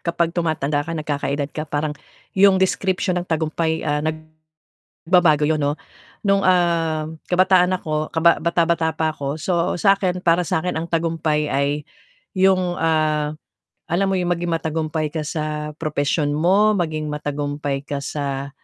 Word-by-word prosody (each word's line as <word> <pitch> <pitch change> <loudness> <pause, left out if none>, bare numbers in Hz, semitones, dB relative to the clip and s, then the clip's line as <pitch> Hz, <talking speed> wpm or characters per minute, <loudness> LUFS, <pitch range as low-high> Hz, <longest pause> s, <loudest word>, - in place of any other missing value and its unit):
kapag 170 0 -1
tumatanda 155 -4 0
ka, 165 - -5
nagkaka-edad 145 -1 -2
ka 155 - -4
parang, 150 +1 -1 0.4
'yong 195 0 +6
description 185 -1 0
ng 175 - -7
tagumpay, 160 0 -1
ah, 145 0 0
nag 155 +1 -3 0.8
babago 165 -4 +4
'yun, 155 0 +1
'no. 145 +1 0 0.5
No'ng, 195 0 +3
ah, 170 -4 +2 0.2
kabataan 185 0 +4
ako 155 -3 -3
kaba 170 +1 +3
bata-bata 170 -1 +1
pa 160 -1 0
ako, 140 0 -4
so 170 +2 0
sa 195 +2 +5
'kin, 180 -2 -1
para 170 +1 +4
sa 160 -1 -1
'kin 180 - 0
ang 165 +1 -4
tagumpay 160 -2 0
ay 140 +1 +1 0.6
'yong, 185 -2 +3
ah, 155 -2 +1 0.5
alam 190 +3 +2
mo 195 - +1
'yong 180 -1 0
maging 175 0 -3
matagumpay 160 -1 -1
ka 160 - -2
sa 150 -1 -3
propesyon 145 -1 0
mo, 195 +8 +3
maging 160 -5 -1
matagumpay 145 -1 -3
ka 140 -1 -4
sa, 140 -1 -3
160 Hz, 150 wpm, -21 LUFS, 150-175 Hz, 0.8 s, yong